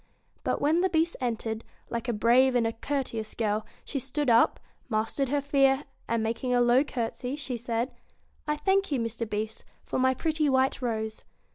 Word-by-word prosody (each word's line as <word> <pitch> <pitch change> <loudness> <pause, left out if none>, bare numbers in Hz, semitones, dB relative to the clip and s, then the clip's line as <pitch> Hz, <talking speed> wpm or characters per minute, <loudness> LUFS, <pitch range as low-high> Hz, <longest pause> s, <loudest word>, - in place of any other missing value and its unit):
But - - 0
when 315 +4 +3
the 375 - +2
Beast 330 0 +1
entered, 225 -2 -2 0.3
like 235 +1 -3
a - - +2
brave 240 +4 +4
and 235 -2 +3
a 225 - 0
courteous 230 -4 -3
girl 215 -1 -1 0.2
she 280 - -2
stood 270 +1 0
up, 230 - +4 0.3
mastered 225 +4 0
her 285 +1 +1
fear, 275 0 +3 0.2
and, 230 -1 0
making 235 +3 0
a - - +4
low 245 +2 +5
courtesy, 250 0 -3 0.2
said: 235 +1 -2 0.3
' - - -38
I 300 0 0
thank 390 +1 +1
you, 275 - +1
Mr. 230 -1 -3
Beast, 215 +1 -3 0.2
for - - -2
my 260 0 +3
pretty 310 0 +1
white 265 0 +2
rose.' 220 -3 -2
245 Hz, 180 wpm, -28 LUFS, 225-280 Hz, 0.3 s, low